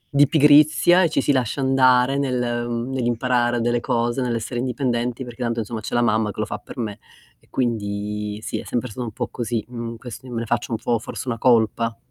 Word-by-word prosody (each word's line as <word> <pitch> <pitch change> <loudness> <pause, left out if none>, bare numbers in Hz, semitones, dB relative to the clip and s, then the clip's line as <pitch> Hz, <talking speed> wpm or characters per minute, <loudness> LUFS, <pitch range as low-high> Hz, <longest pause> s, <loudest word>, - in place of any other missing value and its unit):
di 145 0 +6
pigrizia 155 +4 +5
e 165 - +3
ci - - 0
si 145 - +2
lascia 130 0 0
andare 130 0 +4
nel 130 -3 0
ehm, 120 +1 -2
nell'imparare 120 -1 +1
delle 120 +1 +1
cose, 120 +2 0
nell'essere 120 0 -2
indipendenti 125 -1 -1
perché 120 0 -10
tanto, 115 -1 -1
insomma, 110 0 -4
"C'è - - -4
la 120 - +3
mamma 110 -1 +2
che - - -11
lo 110 - 0
fa - - -5
per - - -12
me". 105 -4 -4 0.4
E - - -29
quindi, 105 -3 -2
sì, - - -3
è - - -7
sempre 125 +1 -2
stato 125 +3 -5
un - - -5
po' - - -3
così, 115 -2 -3
mhmm, 115 -1 -6
quest 120 +1 -9
io 125 - -10
me 115 - -2
ne 115 - -4
faccio 120 +1 -2
un - - 0
po' 115 0 0
forse 125 - -7
una 115 -2 -2
colpa. 115 -1 +2
120 Hz, 225 wpm, -22 LUFS, 115-130 Hz, 0.4 s, di